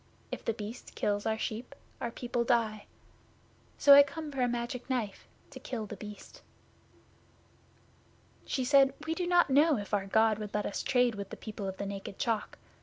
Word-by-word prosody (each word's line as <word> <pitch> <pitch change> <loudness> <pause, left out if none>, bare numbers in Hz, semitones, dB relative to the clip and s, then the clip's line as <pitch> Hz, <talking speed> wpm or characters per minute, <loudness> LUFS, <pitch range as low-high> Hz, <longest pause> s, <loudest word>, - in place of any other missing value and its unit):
If - - -5
The 230 - -1
Beast 220 +2 -8
kills 205 0 0
our 220 0 +1
sheep, 230 +5 -5 0.3
our 235 - -1
people 240 0 -2
die. 230 -3 0 0.9
So 285 - +8
I 280 - +11
come 295 +2 -3
for 270 -2 -3
a 250 - +3
Magic 240 +1 -4
Knife 235 -6 -3 0.2
to - - -9
kill 230 -4 -5
The 210 - -7
Beast." 210 +1 -10 2.1
'She 260 -3 -1
said, 275 0 +5
"We 320 - 0
do 350 +1 -2
not 350 -5 +4
know 295 +1 +5
if 205 0 -7
our 195 -1 +1
God 220 +1 +3
will 210 -1 -5
let 210 - 0
us 200 - -3
trade 245 -2 +2
with 200 -2 -6
the - - -8
people 210 -2 -6
of 190 0 -5
the 200 - -4
Naked 195 -1 -6
Chalk. 225 -2 -2
235 Hz, 185 wpm, -31 LUFS, 210-265 Hz, 2.1 s, I